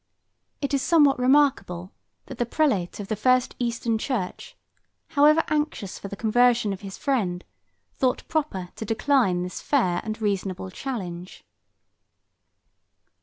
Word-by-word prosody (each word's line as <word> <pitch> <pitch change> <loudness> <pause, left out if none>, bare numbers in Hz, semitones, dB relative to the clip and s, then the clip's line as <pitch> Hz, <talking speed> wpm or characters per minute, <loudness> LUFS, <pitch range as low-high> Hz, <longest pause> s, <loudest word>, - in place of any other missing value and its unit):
It 280 0 -2
is 275 - +2
somewhat 290 -3 +4
remarkable, 250 -10 +2 0.3
that 265 - -10
the 240 - +1
prelate 225 - 0
of 200 - -5
the 215 - -1
first 255 +4 +2
eastern 230 -2 -1
church, 220 -8 -4 0.5
however 305 +1 +5
anxious 295 -10 -2
for - - -7
the 200 - -6
conversion 235 -1 +3
of 195 - -8
his 195 -1 -8
friend, 195 -11 -1 0.5
thought 255 -1 -1
proper 285 - -2
to - - -4
decline 225 -5 +1
this 180 - -6
fair 185 -12 +1
and 215 0 -5
reasonable 195 -3 -2
challenge. 185 -8 -6
230 Hz, 130 wpm, -25 LUFS, 190-275 Hz, 0.5 s, however